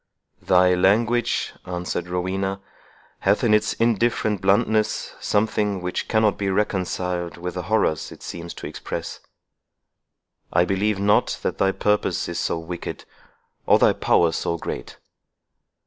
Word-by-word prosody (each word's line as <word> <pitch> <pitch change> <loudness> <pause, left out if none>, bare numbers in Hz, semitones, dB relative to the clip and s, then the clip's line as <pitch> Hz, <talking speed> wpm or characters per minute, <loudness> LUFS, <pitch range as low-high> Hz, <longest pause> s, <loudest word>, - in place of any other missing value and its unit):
"Thy 90 -1 +4
language," 110 +6 +2
answered 90 0 -4
Rowena, 95 +2 -2 0.6
"hath 100 +4 +2
in 115 -3 +4
its 105 0 +3
indifferent 115 -3 +1
bluntness 105 +2 +1
something 105 -1 0
which 90 0 -3
cannot 110 -2 +2
be 100 -1 0
reconciled 90 -3 -1
with 90 +1 -5
the 90 - -3
horrors 110 -8 +1
it - - -12
seems 85 0 -7
to - - -8
express. - - -6 1.3
I 85 +1 +3
believe 100 +2 0
not 105 +1 +2
that - - -2
thy 95 - +3
purpose 105 +1 0
is - - -3
so - - -1
wicked, 85 +1 -6 0.6
or - - +6
thy - - +4
power 85 -1 +3
so 85 +2 -2
great." 60 - -6
95 Hz, 130 wpm, -23 LUFS, 90-105 Hz, 1.3 s, or